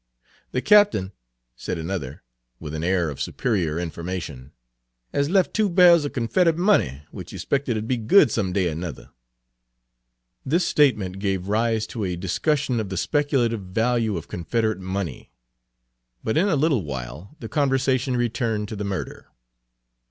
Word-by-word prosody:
"The 125 - -2
Cap'n," 205 - +4 0.4
said - - -4
another, 80 -5 -5 0.4
with 75 -2 -7
an 80 +1 -4
air 85 -3 +1
of 70 - -8
superior 90 -10 -1
information, 85 -5 -5 0.6
"has 140 +1 +1
left 190 0 +2
two 215 -2 +2
bairls 175 -3 +6
of 145 - -4
Confedrit 155 +8 +2
money, 125 - +2
which - - -9
he - - -8
'spected 135 -5 -1
'ud 110 +1 -4
be 125 - 0
good 115 - +5
some 100 -5 -1
day 90 -3 +1
er - - -4
nuther." 85 0 -7 1.3
This 170 +6 +1
statement 105 - +2
gave 95 -1 -2
rise 110 +1 +1
to 110 -1 -5
a 90 -2 -2
discussion 125 - 0
of 105 -3 -3
the 95 - -4
speculative 130 - +1
value 110 +2 0
of 80 - -7
Confederate 110 +3 -1
money; 95 -6 -5 0.9
but 110 - -1
in 180 +6 +3
a 170 - +2
little 140 - +2
while 70 - -7
the - - -6
conversation 135 -3 +1
returned 115 -3 -1
to 110 - -5
the 105 - -4
murder. 100 -2 -5
110 Hz, 155 wpm, -23 LUFS, 90-135 Hz, 1.3 s, bairls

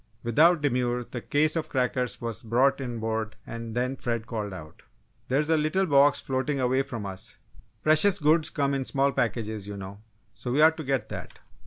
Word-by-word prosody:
Without 155 +8 +4
demur, 125 -3 0
the 120 0 -7
case 155 +5 +1
of 165 - -2
crackers 125 -1 -1
was 115 -2 -5
brought 130 +5 +2
inboard 110 -3 -3
and 115 -1 -7
then 125 +2 0
Fred 115 -3 -3
called 110 -3 -4
out: 75 -5 -10 0.5
"There's 150 +4 +1
a 160 - +4
little 155 +6 +1
box 145 -2 +4
floating 135 +2 -2
away 130 +1 +2
from 115 -6 -6
us 95 -1 -5 0.5
'precious 155 +6 +5
goods 155 0 +3
come 140 -2 0
in 135 -1 -1
small 140 +2 +1
packages,' 110 -4 -2
you 100 0 -6
know, 100 +1 -8 0.3
so 120 - -6
we 135 - +1
ought 160 0 +5
to 160 - -5
get 135 -5 -1
that!" - - -8
130 Hz, 185 wpm, -27 LUFS, 115-145 Hz, 0.5 s, precious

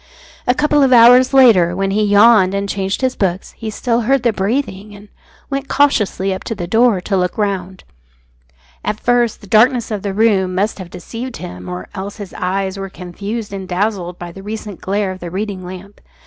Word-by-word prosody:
A 250 - +3
couple 295 0 +2
of 270 -1 +3
hours 245 +1 +7
later, 220 -11 +5
when 195 +1 -1
he 210 +2 +1
yawned 205 -2 +5
and 200 0 -2
changed 195 +1 -2
his 260 -1 0
books, 190 -1 -2
he 225 - -7
still 235 +2 -1
heard 265 +3 +1
the 235 -2 +2
breathing, 205 -1 -3
and 205 +1 -15 0.4
went 275 0 -3
cautiously 210 -10 +1
up 190 - -6
to 225 - -3
the 175 -4 -4
door 225 +2 +3
to 195 +2 -2
look 180 -1 -1
round. 190 -3 -3 1.0
At 215 - -2
first 240 -2 +1
the - - -12
darkness 235 +4 +3
of 210 -2 -3
the 195 -1 -4
room 195 -4 +2
must 205 +3 -1
have 185 -2 -8
deceived 230 +8 -7
him, 90 0 -8
or 90 +1 -6
else 200 +2 -6
his 205 -3 -9
eyes 190 +1 -2
were 195 0 -5
confused 200 +5 -6
and 190 -1 -6
dazzled 180 -1 -2
by 175 -1 -8
the 195 - -11
recent 210 -1 -7
glare 200 0 -1
of 185 - -8
the 175 - -6
reading 195 +1 -4
lamp. 185 +3 -10
200 Hz, 200 wpm, -17 LUFS, 185-230 Hz, 1.0 s, hours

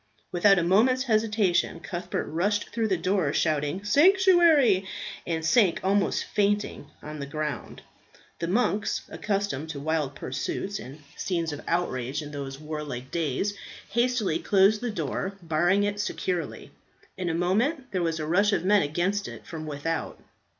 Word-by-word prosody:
Without 195 +3 +5
a 175 - +2
moment's 235 +9 +3
hesitation 215 -7 +1
Cuthbert 175 +1 -4
rushed 205 +6 -1
through 230 -1 0
the 190 -3 +1
door, 185 -3 +1
shouting 155 +4 0
"Sanctuary!" 320 - +5 0.4
and 165 -2 -2
sank 210 -4 +4
almost 195 +1 +1
fainting 205 -7 0 0.2
on 150 0 -7
the 140 - -5
ground. 150 +1 -5 0.6
The 170 - -2
monks, 205 0 0
accustomed 200 -8 -2
to 150 -3 -5
wild 150 -2 -1
pursuits 190 +10 -4
and 140 +4 -10
scenes 170 -4 -2
of 145 - -6
outrage 145 -5 -1
in 145 - -8
those 140 -2 -6
warlike 150 -5 -6
days, 170 +5 -1 0.4
hastily 235 -8 +1
closed 200 +3 +3
the 245 - -2
door, 190 +1 -3
barring 175 +5 +2
it 205 0 -1
securely. 180 -5 -3 0.4
In 180 -2 -3
a 165 - -1
moment 240 - 0
there 185 -2 -1
was 165 -1 -1
a 155 - -2
rush 200 +6 +3
of 180 - 0
men 205 +1 +5
against 175 +7 -1
it - - -10
from 155 -2 -7
without. 155 +3 -3
180 Hz, 150 wpm, -27 LUFS, 155-205 Hz, 0.6 s, Without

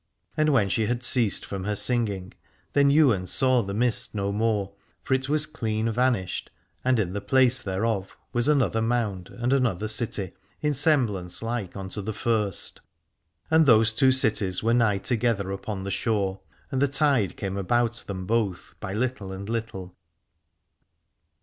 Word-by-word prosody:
And 155 -1 +2
when 120 -8 +3
she 105 +4 0
had 120 +1 -2
ceased 120 -4 +2
from 95 -1 -5
her 105 0 -1
singing 105 -5 0 0.4
then 140 0 +4
Ywain 130 -11 +3
saw 130 +1 +3
the 100 -2 -5
mist 115 -1 0
no 100 -1 -1
more, 105 -2 -1 0.3
for - - -1
it 130 +1 0
was 155 +1 +3
clean 110 -6 -2
vanished 115 -6 0 0.3
and 130 -1 +2
in 95 -4 -1
the 100 - -3
place 130 +1 +3
thereof 95 0 -2 0.2
was 120 +1 0
another 125 -8 +2
mound 110 -6 -1
and 120 +2 -1
another 115 -7 +1
city, 105 -4 -3 0.3
in 150 -1 0
semblance 120 - +1
like 115 -5 -4
unto 95 +2 -5
the 110 +2 -4
first, 105 -2 -1 0.7
and 160 -1 +5
those 110 -2 +5
two 130 +4 +4
cities 105 -8 +2
were 115 +1 +2
nigh 115 -4 +3
together 105 -1 0
upon 95 0 -5
the 100 - -4
shore 100 -4 -1 0.3
and 135 -1 -1
the 140 - +4
tide 135 - +1
came 95 -2 -4
about 120 +4 0
them 95 -2 -5
both 105 -4 -1
by 95 - -5
little 110 -3 -2
and 100 +2 -7
little. 110 -6 -5
110 Hz, 160 wpm, -25 LUFS, 100-125 Hz, 0.7 s, and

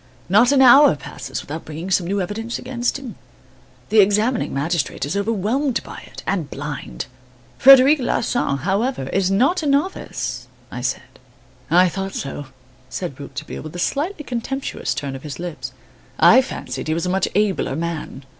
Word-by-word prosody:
Not 215 +7 +5
an 270 -2 +5
hour 275 - +8
passes 140 - -7
without 160 +3 -6
bringing 160 +5 -7
some 175 -2 +2
new 200 +2 0
evidence 225 +5 -4
against 245 0 -2
him. 265 -5 -9 0.7
The 220 - +4
examining 210 +5 +3
magistrate 145 -1 -1
is 145 +6 -3
overwhelmed 225 +6 0
by - - -9
it - - -11
and 175 -7 -1
blind." 135 - -6 0.5
"Frederic 275 +3 +8
Larsan, 240 - 0
however, 195 - -1
is 190 -1 +1
not 265 - +2
a 305 - -2
novice," 130 - -1 0.2
I 125 - -5
said. 125 +1 -4 0.5
"I 180 +3 +5
thought 195 +2 -4
so," 140 0 -5 0.4
said 170 -8 -5
Rouletabille, 145 +1 -7
with 155 +2 -9
a 175 - +1
slightly 305 +3 -3
contemptuous 250 - -3
turn 135 0 -4
of 135 - -8
his 145 -1 -7
lips, 150 -7 -6 0.5
"I 200 +11 +7
fancied 140 - -6
he 155 - 0
was 165 - -2
a - - -1
much 190 +1 +1
abler 200 -9 +1
man. 160 -4 -4
190 Hz, 165 wpm, -21 LUFS, 150-245 Hz, 0.7 s, hour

